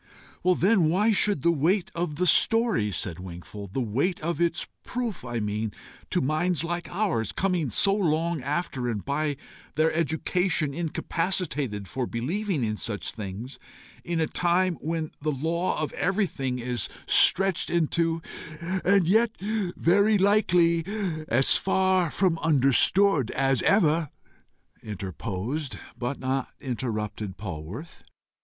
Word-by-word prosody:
"Then 185 -1 +3
why 205 +7 +3
should 205 -7 +1
the 170 - +4
weight 170 +5 +1
of 170 -3 -3
the 180 +4 0
story," 225 - +3
said 90 -2 -3
Wingfold, 95 +2 -9
"the 135 - +1
weight 135 - -1
of 170 +2 -2
its 170 0 0 0.2
proof, 240 -6 -4
I 120 -1 -3
mean, 105 0 -2 0.4
to - - +1
minds 155 +3 0
like 175 +1 -3
ours, 175 - -1
coming 180 -7 0
so 195 - +3
long 165 -4 0
after, 135 -3 -2
and 105 -4 -4
by 145 0 -1 0.4
their 155 +1 +2
education 165 0 0
incapacitated 150 - -2
for 125 +6 -3
believing 165 - -2
in 110 -1 -1
such 105 -2 -4
things, 110 +5 -7 0.4
in 170 -1 -2
a 160 - +2
time 180 +3 +1
when 160 -1 -3
the 155 - -1
law 165 +6 -1
of 155 - -3
everything 175 -10 -1
is 125 0 -2 0.2
searched 195 -2 +4
into 165 0 0 0.3
" 155 - -12
"And 190 +2 +2
as - - -3
yet 225 +4 +3
very 205 0 +2
likely 180 -4 +3 0.4
as 130 +4 +7
far 190 -2 +2
from 175 0 +1
understood 145 - +4
as 135 -2 +1
ever," 165 -6 +3 0.7
interposed 105 - -5 0.2
but 125 +3 -3
not 130 0 -2
interrupted 105 -5 -4
Polwarth. 95 - -7
160 Hz, 135 wpm, -26 LUFS, 125-180 Hz, 0.7 s, as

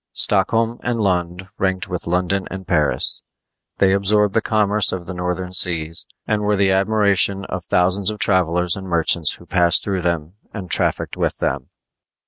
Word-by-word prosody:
Stockholm 115 +4 +2
and 120 -1 -2
Lund 90 -2 -1
ranked 95 -1 -1
with 90 -1 -5
London 90 +2 -1
and 95 -1 -8
Paris. 80 -5 0 0.6
They 95 -1 +3
absorbed 100 +1 +2
the 115 - +2
commerce 105 -1 +2
of 90 -2 -5
the 95 - -7
northern 90 0 -4
seas, 85 -2 +1 0.2
and 105 -1 -1
were 105 0 +1
the 95 -1 +2
admiration 100 -1 +1
of - - -6
thousands 95 +2 +2
of 105 - -4
travelers 90 -3 +1
and 95 -1 -8
merchants 85 -2 +2
who 85 - -13
passed 85 -2 +2
through 95 -2 -2
them 85 -1 -2 0.2
and 95 -5 -8
trafficked - - -1
with - - -1
them. 65 -1 -3
95 Hz, 165 wpm, -19 LUFS, 90-100 Hz, 0.6 s, They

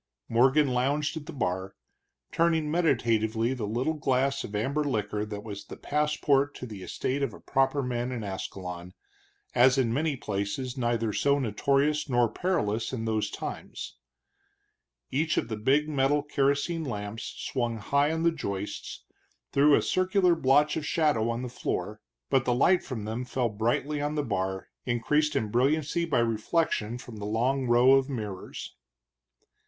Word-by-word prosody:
Morgan 135 +5 +4
lounged 140 +5 0
at 150 -2 -7
the - - -5
bar, 95 -6 -2 0.6
turning 160 -2 +2
meditatively 115 -7 +1
the 115 -5 -3
little 125 +9 0
glass 135 -2 0
of 105 - -7
amber 140 +8 0
liquor 105 -6 -1
that 105 -1 -6
was 100 -2 -7
the - - -9
passport 145 -1 +1
to - - -7
the 105 -5 -8
estate 130 +8 -2
of 140 - -1
a - - -13
proper 135 +1 +1
man 125 0 -2
in 120 -3 -4
Ascalon, 90 -2 -6 0.6
as 125 +2 +5
in 120 -4 +2
many 150 +2 0
places 120 +3 -3
neither 120 -3 0
so 140 +5 +2
notorious 140 +5 +1
nor 120 -2 +3
perilous 115 - 0
in 115 -4 -3
those 110 -1 0
times. - - -7 1.1
Each 155 +4 0
of 115 - 0
the 110 - -2
big 135 +8 +2
metal 145 0 +2
kerosene 145 +3 0
lamps 105 -4 -5
swung 120 -3 -2
high 140 +7 +1
on 160 0 -1
the 170 - +4
joists 100 -10 -5 0.5
threw 145 +1 +5
a - - +2
circular 185 -1 +3
blotch 145 -1 +3
of 160 - -2
shadow 145 -8 +1
on 115 +2 -2
the - - -3
floor, 125 - -4 0.3
but 135 -2 +4
the 125 - +2
light 175 +8 +4
from 115 -6 -6
them 110 +3 -3
fell 125 -1 -1
brightly 120 +8 -1
on 145 +1 -1
the 150 - 0
bar, 95 -5 -2
increased 150 +6 +1
in 110 - 0
brilliancy 150 +7 +1
by 165 - 0
reflection 115 0 0
from 120 -2 -10
the 105 - -5
long 125 +5 0
row 120 +2 +6
of 135 0 +4
mirrors. 105 -8 -6
130 Hz, 160 wpm, -28 LUFS, 110-145 Hz, 1.1 s, row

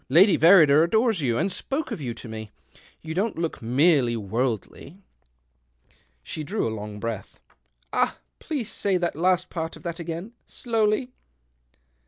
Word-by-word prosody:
Lady 180 +8 +6
Verrider 160 -4 +7
adores 220 +2 +2
you, 120 -4 0
and 190 - 0
spoke 275 +10 -3
of - - -4
you 125 -4 -3
to 115 - -9
me. 110 -1 -7 0.5
You 160 0 -5
don't 205 +6 -1
look 165 -1 -3
merely 125 0 +3
worldly." 115 - -3 1.3
She 155 - -6
drew 205 - -1
a 110 - -3
long 105 -1 -7
breath. 110 -3 -5 0.3
" - - -42
Ah! - - +1 0.2
please 285 -9 -3
say 195 -2 0
the 175 -1 0
last 180 +3 +1
part 160 -2 -4
of - - -15
that 170 -1 -5
again 170 +6 -6
— - - -45
slowly." 225 +1 0
165 Hz, 160 wpm, -25 LUFS, 120-195 Hz, 1.3 s, Verrider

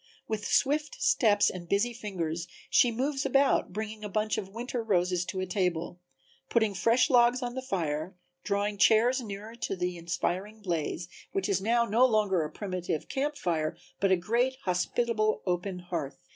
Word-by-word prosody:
With 215 -2 -3
swift 300 - +1
steps 210 - +4
and 175 -2 -9
busy 215 +5 +2
fingers 175 -7 -4 0.2
she 245 - +5
moves 270 +4 -1
about, 275 -6 +2
bringing 215 +2 -5
a 210 - -4
bunch 215 +2 0
of 190 - -7
winter 240 +3 -4
roses 180 -4 +1
to 190 0 -3
a - - -1
table, 180 -2 -1 0.5
putting 220 -3 +2
fresh 230 +7 +3
logs 245 +1 +4
on 245 0 -3
the 260 - -4
fire, 170 - -2 0.3
drawing 205 0 -1
chairs 235 +5 +5
nearer 210 0 -7
to 235 -4 -3
the 180 -1 -2
inspiring 185 +5 -3
blaze, 170 -1 -2 0.3
which 195 -1 0
is 195 -2 +1
now 235 +3 +2
no 230 +3 +3
longer 210 -6 +2
a 150 - -4
primitive 185 -4 -4
camp 290 +2 -1
fire 165 -2 -1 0.2
but 195 -1 +2
a 190 - +5
great, 235 +8 +1
hospitable 215 +4 0
open 180 +1 -1
hearth. 175 -6 -4
205 Hz, 170 wpm, -29 LUFS, 180-235 Hz, 0.5 s, she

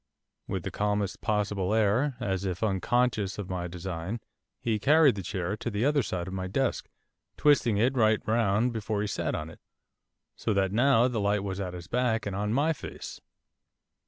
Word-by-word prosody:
With - - -3
the - - -4
calmest 105 -1 -1
possible 105 -1 0
air, 115 +6 +2
as 95 -1 -1
if 95 +1 -3
unconscious 110 0 +1
of 100 -3 -5
my 90 -1 -2
design, 90 +4 -5 0.4
he 110 -2 0
carried 145 +4 +5
the 100 - -5
chair 95 +1 -3
to 120 - -3
the 105 +2 -1
other 145 0 +3
side 90 -6 -3
of 95 - -6
my 95 -1 -3
desk, 130 +7 -1 0.5
twisting 130 -7 +4
it 120 +5 +3
right 110 -3 +4
round 110 +1 +2
before 110 -1 -2
he 105 - -1
sat - - -2
on 75 +1 -5
it, - - -15 0.8
so 110 - -1
that 95 -1 +2
now 120 +2 +4
the 120 -3 -2
light 100 0 +1
was 95 -1 -4
at 90 -2 -4
his 90 -1 -8
back 120 +2 0
and 100 -2 -3
on 105 +1 -1
my 145 +7 +2
face. 140 - -8
105 Hz, 190 wpm, -28 LUFS, 95-120 Hz, 0.8 s, carried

